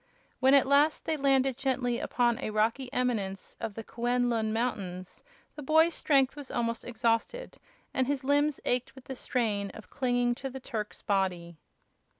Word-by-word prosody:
When, 265 +1 +5
at 275 - +5
last, 285 +3 +3
they 320 - 0
landed 270 -3 +2
gently 250 -3 0
upon 240 -1 +1
a 275 - -3
rocky 225 +5 0
eminence 220 -7 -2
of 210 - -4
the 225 - -6
Kuen 245 +2 0
Lun 220 -2 0
mountains, 195 -6 -3 0.3
the 295 - -7
boy's 320 +4 +4
strength 275 -4 +2
was 290 -3 -9
almost 230 -1 -2
exhausted, 240 - -1 0.3
and 260 -2 +1
his 280 -1 -1
limbs 290 +1 +2
ached 250 +1 0
with 265 - -13
the 265 - -6
strain 215 -6 -1
of 220 - -12
clinging 245 -2 +1
to 270 +3 -6
the 265 +1 -7
Turk's 220 -5 -6
body. 180 -5 -1
245 Hz, 165 wpm, -29 LUFS, 225-270 Hz, 0.3 s, When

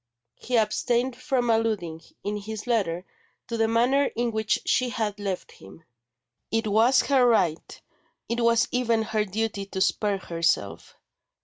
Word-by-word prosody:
He 245 -1 -1
abstained 240 +3 +1
from 250 -3 0
alluding, 210 -8 -1 0.2
in 205 +1 -2
his 215 +1 -6
letter, 190 -7 0 0.4
to 235 - -3
the 225 -1 +2
manner 245 +5 +3
in 240 0 0
which 220 -1 0
she 255 -1 +2
had 215 -4 -3
left 195 -3 -4
him; 95 +12 -15 0.7
it 225 0 0
was 225 +5 +4
her 270 -3 +3
right, 185 -10 +1 0.5
it 235 +1 -2
was 235 0 +3
even 235 -3 +1
her 215 -1 -1
duty 210 0 -3
to 190 - -5
spare 200 +1 +1
herself. 165 - -2
220 Hz, 145 wpm, -26 LUFS, 200-240 Hz, 0.7 s, was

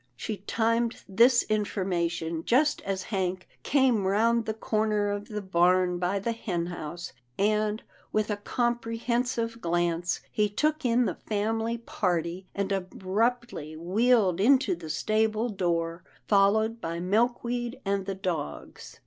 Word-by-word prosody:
She 210 - -4
timed 230 +3 0
this 235 +5 +5
information 175 -6 -1
just 290 +5 +2
as 195 -1 -3
Hank 185 -1 -1
came 255 -8 +2
round 230 +4 +2
the 220 - -1
corner 215 -2 0
of 205 0 -4
the 210 -2 -5
barn 180 0 +3
by 180 +3 0
the 200 +4 -1
hen 185 -7 -2
house, 175 0 -6 0.2
and, 210 +1 +1 0.3
with 215 0 0
a 205 - -1
comprehensive 235 +1 -1
glance, 175 0 0
he 210 -1 +1
took 305 +9 0
in 240 +1 +3
the - - 0
family 225 +2 -2
party, 180 -5 -2
and 200 0 -1
abruptly 195 -2 -1
wheeled 195 +1 +2
into 255 -3 +4
the 165 -2 -9
stable 215 +7 +1
door, 170 -3 -1 0.2
followed 220 +3 +3
by 165 +1 -3
Milkweed 240 +5 0
and 195 -1 -1
the 195 - -2
dogs. 175 - -5
205 Hz, 130 wpm, -28 LUFS, 180-230 Hz, 0.3 s, this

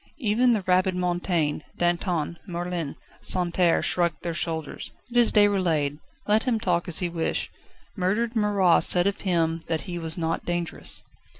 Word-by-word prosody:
Even 240 -1 +2
the 210 -4 -1
rabid 185 0 +2
Mountain, 175 -4 -1 0.2
Danton, 175 -2 -1
Merlin, 175 -4 -4 0.3
Santerre, 175 -1 +1
shrugged 170 -4 -1
their 170 - -2
shoulders. 160 -3 -4 0.2
"It 245 - -2
is 240 -1 +6
Déroulède, 175 -9 +2 0.3
let 210 +1 +2
him 240 -4 +1
talk 175 -5 0
an 175 - -2
he 180 - 0
list. 170 -1 -2 0.5
Murdered 215 +5 -1
Marat 205 -5 +3
said 175 0 +7
of 200 0 -1
him 165 -3 0
that 160 -1 -1
he 175 -3 -6
was 165 0 -1
not 165 -1 -2
dangerous." 175 -1 -3
175 Hz, 155 wpm, -25 LUFS, 165-200 Hz, 0.5 s, said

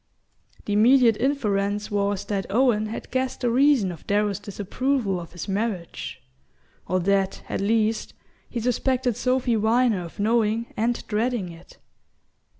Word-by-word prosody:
The 205 - -1
immediate 235 +2 +5
inference 210 -6 0
was 200 -1 0
that 200 -2 -2
Owen 215 -1 +2
had 220 - -7
guessed 260 0 -2
the 245 -2 +1
reason 260 -6 +4
of 170 - -11
Darrow's 205 -1 +1
disapproval 205 +1 -1
of 170 -1 -10
his 175 - -6
marriage, 200 -3 -3 0.6
or 185 - +1
that, 195 +1 0
at - - -3
least, 220 +1 0 0.3
he 240 - -3
suspected 250 +1 0
Sophy 255 0 +1
Viner 225 -1 +2
of 170 +4 -11
knowing 225 +1 +1
and 235 +2 -1
dreading 225 -3 -1
it. 165 0 -14
215 Hz, 140 wpm, -24 LUFS, 200-245 Hz, 0.6 s, immediate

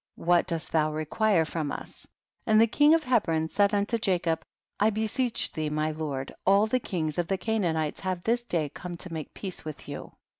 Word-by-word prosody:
what 175 0 +3
dost 165 -2 -2
thou 155 -1 +2
re 155 +1 -3
quire 200 -1 +2
from 155 -3 -3
us? - - -8 0.4
and 215 0 +5
the 225 - +7
king 295 +7 +5
of 325 - 0
He 255 -3 +4
bron 160 -1 -1
said 200 +4 +2
unto 205 +3 0
Jacob, 175 -6 +1 0.4
I 210 - +4
beseech 220 +3 0
thee 155 -2 -2
my 155 +1 0
lord, 145 -4 -4
all 200 +2 +5
the 255 +4 +1
kings 165 -8 -2
of 175 - 0
the 195 - 0
Canaan 200 -5 0
ites 155 -2 -2
have 185 -2 -3
this 235 +1 +1
day 170 -9 -1
come 175 +4 -7
to 180 -1 -6
make 155 -3 -6
peace 190 -3 -5
with 155 -2 -8
you. - - -7
175 Hz, 215 wpm, -28 LUFS, 155-215 Hz, 0.4 s, the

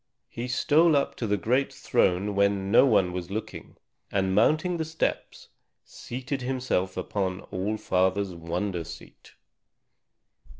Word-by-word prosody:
He 120 +2 -5
stole 155 +6 +3
up 140 - +1
to 115 - -2
the 105 0 +1
great 125 +8 +1
throne 95 +3 +1
when 100 -1 +1
no 120 - +6
one 95 -7 +3
was 90 -1 -5
looking, 110 +3 -6 0.3
and 95 -1 0
mounting 155 - +2
the 160 - -1
steps, 160 +1 -3 0.4
seated 130 +2 -6
himself 125 -8 -1
upon 95 0 -2
All 100 +4 -2
Father's 95 0 0
wonder 85 +2 -3
seat. - - -13
100 Hz, 130 wpm, -27 LUFS, 95-130 Hz, 0.4 s, no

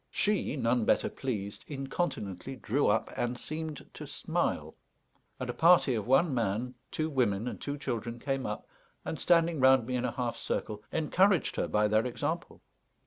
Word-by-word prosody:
She, 210 -7 +1
none 120 -3 +1
better - - +2
pleased, 105 -7 -4
incontinently 135 - -3
drew 130 +4 0
up 110 +2 +1
and 120 0 -1
seemed 155 0 -5
to - - -8
smile, - - -1 0.7
and 130 - -3
a 125 - -2
party 165 -4 +5
of 110 -2 -2
one 135 +4 +4
man, 115 +1 -1 0.2
two 155 - -1
women, 120 -7 +1
and - - -5
two 145 0 -3
children 120 -4 -3
came 135 +1 -2
up, 105 - -5 0.4
and, 160 - -4
standing 170 -2 +3
round 130 -2 +6
me 125 +1 -2
in 125 - 0
a - - 0
half 120 -3 -2
circle, 105 -1 -3
encouraged 180 +3 +2
her - - 0
by 105 0 +2
their 110 +3 +2
example. 120 - -4
130 Hz, 170 wpm, -30 LUFS, 115-150 Hz, 0.7 s, round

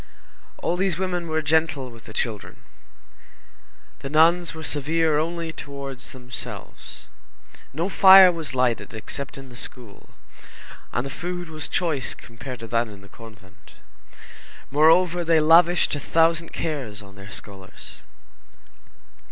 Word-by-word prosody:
All 175 - 0
these 185 -3 0
women 180 -2 -2
were 160 0 -1
gentle 150 -4 +1
with 115 -1 -15
the - - -10
children. 110 -2 -4 1.4
The 135 - -6
nuns 165 +3 +3
were 160 - -8
severe 155 +1 +1
only 165 0 -3
towards 140 -3 -8
themselves. 125 -1 -9 0.7
No 165 +6 -2
fire 190 -1 +9
was 160 -6 -6
lighted 125 -3 0
except 135 +6 -6
in 135 -1 -10
the 125 - -13
school, 120 -4 -8 0.8
and 120 - -2
the 135 - -6
food 175 +2 -5
was 155 -1 -4
choice 160 -7 -1
compared 120 +1 -10
to 115 - -7
that 115 +1 +1
in 100 -2 -12
the 100 - -16
convent. 105 -3 -16 1.0
Moreover, 165 +4 +4
they 165 -1 +4
lavished 165 +3 +5
a 145 - -1
thousand 165 +2 +2
cares 125 -10 -4
on 100 0 -14
their 100 0 -12
scholars. 95 -1 -9
150 Hz, 135 wpm, -24 LUFS, 120-165 Hz, 1.4 s, fire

